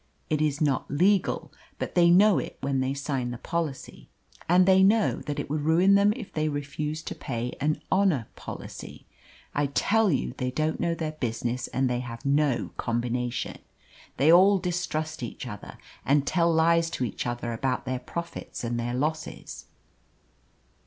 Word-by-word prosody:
It 155 -1 +1
is 150 -2 +1
not 140 -4 +1
legal, 185 +7 +1 0.2
but - - -4
they 170 -1 +5
know 190 -1 +6
it - - -6
when 135 -1 -1
they 130 +1 -1
sign 135 -3 -2
the 120 - -5
policy; 165 -2 -4 0.4
and 180 +1 +6
they 190 0 +5
know 210 +3 +4
that 145 0 -3
it - - -3
would 150 +1 -2
ruin 170 +6 +4
them 200 +1 +5
if 230 -6 -9
they 155 0 0
refused 150 +2 -4
to - - -4
pay 120 -2 -4
an 150 +2 0
'honour 190 - +2
policy.' - - -9 0.5
I 145 0 +1
tell 205 +9 +2
you 135 -3 -1
they 125 -1 0
don't 155 +4 -1
know 170 -1 0
their 160 -2 -3
business 120 -3 -3
and 130 +1 0
they 125 -1 -1
have 120 -1 -7
no 140 -2 +1
combination. 120 +1 -2 0.6
They 150 +4 +5
all 190 +3 +7
distrust 170 -4 -3
each 120 +1 -6
other, 105 -5 -8 0.3
and 140 0 +2
tell 170 -1 +2
lies 165 +1 +3
to - - -1
each 120 - -4
other 120 -1 -3
about 130 +4 -2
their 130 -1 -2
profits 170 +4 -6
and 120 0 -2
their 120 +1 -2
losses. 155 +4 -4
150 Hz, 170 wpm, -27 LUFS, 125-170 Hz, 0.6 s, all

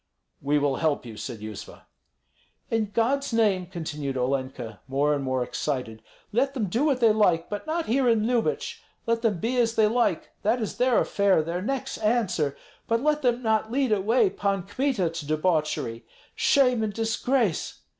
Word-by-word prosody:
"We 145 +2 +1
will 145 -2 +1
help 155 -5 0
you," 115 -2 -8
said 115 0 -7
Yuzva. 110 -1 -9 0.9
"In 220 -2 0
God's 260 +6 +1
name," 205 -6 +2
continued 150 -6 -4
Olenka, 130 -3 -3
more 140 +2 +1
and 140 -1 -2
more 130 -1 0
excited, 125 -4 -3 0.3
"let 270 +5 +1
them 215 -7 -1
do 235 +9 0
what 270 -4 +1
they 225 -2 +6
like, 180 -6 +2
but 205 +8 -5
not 325 +1 -1
here 255 +2 +2
in 220 -2 +2
Lyubich. 235 -1 -1 0.2
Let 230 0 +1
them 220 -5 +1
be 235 +9 -1
as 230 -2 +2
they 220 - +4
like, 220 -6 +1
that 225 +4 +1
is 220 - -4
their 250 -1 +3
affair, 200 -5 +2
their 170 +3 -3
necks' 265 +5 -3
answer; 195 - 0 0.3
but 230 +2 +1
let 300 0 +2
them 245 -2 +1
not 220 0 +1
lead 265 -1 +1
away 225 - +3
Pan 200 - -1
Kmita 205 -3 -1
to 165 -2 -6
debauchery. 155 -7 0 0.3
Shame 250 -5 +3
and 215 -1 -1
disgrace! 225 - 0
210 Hz, 175 wpm, -26 LUFS, 150-240 Hz, 0.9 s, they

